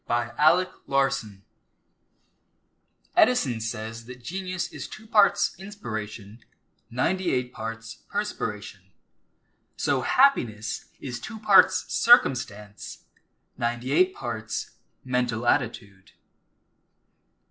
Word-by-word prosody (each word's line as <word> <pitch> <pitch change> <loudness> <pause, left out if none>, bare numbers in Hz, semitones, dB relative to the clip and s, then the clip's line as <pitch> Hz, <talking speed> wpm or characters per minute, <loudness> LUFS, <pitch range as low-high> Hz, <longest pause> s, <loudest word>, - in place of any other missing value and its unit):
DAYS 120 -1 0
OF 175 +5 +5 0.2
CHEER 135 -7 0 1.7
Edison 135 - +3
says 115 0 -5
that 125 0 -11
genius 185 +5 -4
is - - -6
two 215 - -11
parts 210 -2 +3
inspiration, 110 - -7 0.5
ninety 180 +10 0
eight 125 -1 -1
parts 115 +1 -7
perspiration. 105 - -4 1.0
So 140 -3 +1
happiness 120 - +2
is 125 -3 -6
two 220 - -8
parts 210 -3 +5
circumstance, 110 - +2 0.6
ninety 120 +2 -2
eight 185 +5 +3
parts 110 -2 -4 0.3
mental 125 -2 -1
attitude. 110 -7 -1
125 Hz, 90 wpm, -26 LUFS, 110-185 Hz, 1.7 s, OF